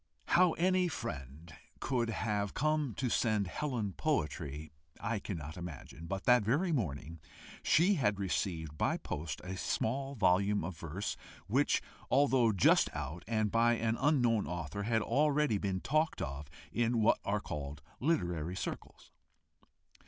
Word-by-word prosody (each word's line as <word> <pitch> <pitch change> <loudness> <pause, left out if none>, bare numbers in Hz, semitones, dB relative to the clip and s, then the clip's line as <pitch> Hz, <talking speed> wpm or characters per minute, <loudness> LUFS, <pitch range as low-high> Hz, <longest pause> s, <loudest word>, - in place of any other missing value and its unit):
How 180 -1 +5
any 185 +1 +2
friend 80 - -6 0.3
could 120 -3 0
have 105 -2 -1
come 150 -4 0
to 130 - -1
send 110 -3 +1
Helen 115 - -2
poetry 75 - -2 0.3
I 110 0 -1
cannot 80 -6 -6
imagine, 85 -1 -8
but 95 +1 -3
that 125 -1 +5
very 145 - +1
morning 80 - -2 0.4
she 180 +6 +4
had 125 - +1
received 85 -5 -2
by - - +2
post 75 0 -5
a 90 +1 -5
small 135 +8 -1
volume 100 -1 +3
of 90 +1 -4
verse, 85 +6 -4 0.3
which, - - +2 0.3
although 130 -4 +4
just 95 -4 +4
out, 85 +2 -5
and 110 -2 0
by 115 +1 +4
an 115 -1 0
unknown 120 -6 +2
author, 85 +1 -4
had 110 +1 +1
already 145 -6 +2
been 95 -2 -2
talked 155 +2 +1
of 70 +1 -4 0.2
in 120 0 +1
what 110 - +4
are 105 +1 0
called 75 -5 -6 0.2
literary 90 - 0
circles. - - -6
105 Hz, 140 wpm, -33 LUFS, 85-130 Hz, 0.4 s, How